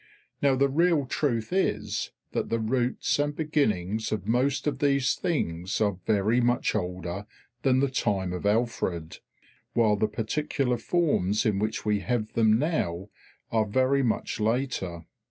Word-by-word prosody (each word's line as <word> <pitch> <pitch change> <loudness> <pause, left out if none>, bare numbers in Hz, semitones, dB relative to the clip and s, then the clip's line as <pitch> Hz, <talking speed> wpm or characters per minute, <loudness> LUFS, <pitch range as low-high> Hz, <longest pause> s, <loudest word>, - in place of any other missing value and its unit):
Now 140 -2 +4
the 140 +1 +3
real 160 +1 +2
truth 125 0 -1
is 105 - 0 0.2
that - - -2
the 115 - +1
roots 120 +5 0
and 145 0 0
beginnings 110 - 0
of 110 -2 -2
most 125 +5 +1
of 140 -3 -1
these 140 -2 +2
things 95 - -2
are 100 -4 +1
very 110 +3 +3
much 120 0 +1
older 90 0 -3 0.3
than 130 0 +3
the 140 - +3
time 100 -8 -1
of 90 - -5
Alfred, 105 -7 -1 0.5
while 110 -3 +3
the 110 - +2
particular 125 +4 -1
forms 115 - +1
in 105 -3 +1
which 110 +2 -2
we 105 -1 +2
have 110 +3 -2
them 110 -1 +4
now 105 - -1 0.4
are 110 -1 +2
very 130 +5 +2
much 115 -2 -1
later. 110 -7 -1
115 Hz, 150 wpm, -27 LUFS, 105-135 Hz, 0.5 s, Now